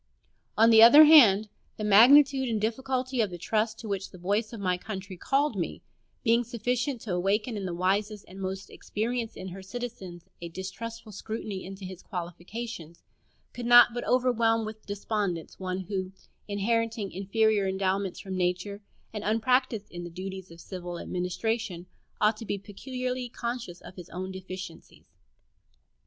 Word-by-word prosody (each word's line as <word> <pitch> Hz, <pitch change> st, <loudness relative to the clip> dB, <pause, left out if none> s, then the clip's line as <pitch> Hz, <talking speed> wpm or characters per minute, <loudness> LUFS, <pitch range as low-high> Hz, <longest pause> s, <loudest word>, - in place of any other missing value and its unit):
On 225 Hz, +1 st, +6 dB
the 220 Hz, 0 st, +8 dB
other 285 Hz, +7 st, +10 dB
hand, 225 Hz, -10 st, +7 dB, 0.3 s
the 215 Hz, -, -4 dB
magnitude 265 Hz, +6 st, +6 dB
and 220 Hz, -2 st, 0 dB
difficulty 255 Hz, +3 st, -1 dB
of 210 Hz, -, +1 dB
the 175 Hz, -, -7 dB
trust 220 Hz, +5 st, -1 dB
to 225 Hz, -, -8 dB
which 195 Hz, -2 st, -3 dB
the 185 Hz, -, -13 dB
voice 205 Hz, +5 st, -1 dB
of 230 Hz, -, -7 dB
my 185 Hz, -2 st, +1 dB
country 190 Hz, 0 st, -7 dB
called 275 Hz, -, 0 dB
me, 175 Hz, -4 st, -4 dB, 0.4 s
being 235 Hz, 0 st, +3 dB
sufficient 245 Hz, +2 st, -2 dB
to 205 Hz, -, -4 dB
awaken 205 Hz, +6 st, 0 dB
in 200 Hz, -2 st, -4 dB
the 175 Hz, -, -4 dB
wisest 200 Hz, +3 st, 0 dB
and 190 Hz, +1 st, -10 dB
most 190 Hz, +1 st, -5 dB
experienced 230 Hz, +2 st, -3 dB
of 190 Hz, 0 st, -7 dB
her 190 Hz, +2 st, -8 dB
citizens 190 Hz, -5 st, -7 dB, 0.2 s
a 170 Hz, -, -6 dB
distrustful 215 Hz, +5 st, -7 dB
scrutiny 210 Hz, -1 st, -5 dB
into 195 Hz, +1 st, -8 dB
his 185 Hz, -1 st, -8 dB
qualifications, 175 Hz, 0 st, -7 dB, 0.5 s
could 240 Hz, -1 st, -5 dB
not 240 Hz, -1 st, +8 dB
but 240 Hz, -, -3 dB
overwhelm 235 Hz, -3 st, +2 dB
with 215 Hz, 0 st, -9 dB
despondence 200 Hz, -4 st, -3 dB
one 185 Hz, 0 st, -3 dB
who 190 Hz, 0 st, -4 dB, 0.4 s
(inheriting 220 Hz, 0 st, -1 dB
inferior 205 Hz, +1 st, +1 dB
endowments 190 Hz, 0 st, -1 dB
from 190 Hz, -1 st, -6 dB
nature 185 Hz, +3 st, -1 dB, 0.3 s
and 210 Hz, -1 st, -5 dB
unpracticed 225 Hz, 0 st, +1 dB
in 175 Hz, 0 st, -7 dB
the 175 Hz, -, -6 dB
duties 190 Hz, +1 st, -7 dB
of 165 Hz, 0 st, -13 dB
civil 175 Hz, -1 st, -7 dB
administration) 180 Hz, +1 st, -3 dB, 0.3 s
ought 210 Hz, +1 st, +3 dB
to 225 Hz, -, -8 dB
be 205 Hz, -, -1 dB
peculiarly 250 Hz, +5 st, -5 dB
conscious 235 Hz, -7 st, -5 dB
of 185 Hz, -, -13 dB
his 180 Hz, -, -10 dB
own 185 Hz, +2 st, -5 dB
deficiencies. 185 Hz, -2 st, -9 dB
205 Hz, 160 wpm, -28 LUFS, 185-230 Hz, 0.5 s, other